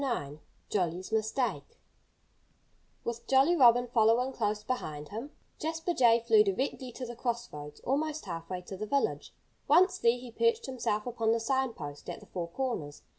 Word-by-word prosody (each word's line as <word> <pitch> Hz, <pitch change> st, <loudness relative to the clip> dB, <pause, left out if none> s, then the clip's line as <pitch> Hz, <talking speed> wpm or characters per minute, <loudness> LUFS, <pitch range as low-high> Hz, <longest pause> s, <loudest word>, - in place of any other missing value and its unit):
IX 150 Hz, -, -2 dB, 0.3 s
JOLLY'S 180 Hz, 0 st, -1 dB
MISTAKE 220 Hz, +4 st, -1 dB, 1.3 s
With 235 Hz, 0 st, -5 dB
Jolly 270 Hz, +6 st, +5 dB
Robin 245 Hz, -4 st, +6 dB
following 240 Hz, +2 st, +3 dB
close 210 Hz, -3 st, -1 dB
behind 150 Hz, -13 st, -4 dB
him, 230 Hz, +7 st, -6 dB, 0.3 s
Jasper 325 Hz, +2 st, -2 dB
Jay 235 Hz, -5 st, +5 dB
flew 225 Hz, -2 st, +5 dB
directly 250 Hz, +5 st, -2 dB
to 255 Hz, -, -6 dB
the 240 Hz, 0 st, -7 dB
crossroads, 230 Hz, -, -4 dB
almost 305 Hz, +3 st, -1 dB
half 165 Hz, -3 st, -6 dB
way 185 Hz, -1 st, -3 dB
to 190 Hz, -, -7 dB
the 215 Hz, +3 st, -5 dB
village. 280 Hz, +4 st, 0 dB, 0.4 s
Once 365 Hz, +5 st, +5 dB
there, 235 Hz, +1 st, +3 dB
he 245 Hz, -1 st, -10 dB
perched 465 Hz, -, +1 dB
himself 215 Hz, -5 st, -2 dB
upon 225 Hz, -2 st, +1 dB
the 230 Hz, -, +1 dB
sign 265 Hz, +1 st, 0 dB
post 145 Hz, -5 st, -8 dB
at -, -, -5 dB
the -, -, -15 dB
four 175 Hz, -2 st, -4 dB
corners. 170 Hz, -, -4 dB
235 Hz, 165 wpm, -30 LUFS, 205-265 Hz, 1.3 s, Robin